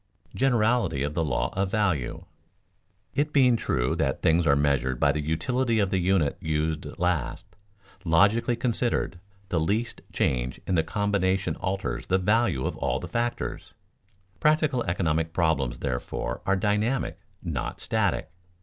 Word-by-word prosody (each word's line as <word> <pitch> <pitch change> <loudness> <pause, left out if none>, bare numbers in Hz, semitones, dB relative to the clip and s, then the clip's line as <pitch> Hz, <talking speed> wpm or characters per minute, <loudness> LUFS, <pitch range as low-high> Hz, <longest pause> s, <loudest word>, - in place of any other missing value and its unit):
[Sidenote: - - -12
Generality 115 - +2
of 75 +1 -2
the 80 - 0
law 75 -5 -1
of 95 0 0
value] 95 - -1 0.9
It 150 +1 0
being 130 -4 +5
true 65 - 0
that - - -1
things 80 +1 +3
are 70 - +5
measured 70 -3 +1
by 70 - +4
the 75 +1 -2
utility 115 - 0
of 100 -3 +1
the 95 - +2
unit 90 -3 +1
used 80 -1 -1
last, 90 -6 -1 0.6
logically 100 +8 +3
considered, 120 -6 -1 0.3
the 85 - +1
least 105 +9 -1
change 60 -1 -1
in - - -1
the 85 - +4
combination 95 +1 0
alters 95 +1 -3
the 95 - +3
value 95 - +1
of - - -2
all 65 +2 -1
the - - -6
factors. 120 0 -3 0.6
Practical 150 -5 +2
economic 80 -2 0
problems, 80 -7 +1
therefore, 60 -1 -3
are 100 - +4
dynamic, 105 +7 0 0.2
not 80 -8 -3
static. - - 0
95 Hz, 145 wpm, -26 LUFS, 80-110 Hz, 0.9 s, being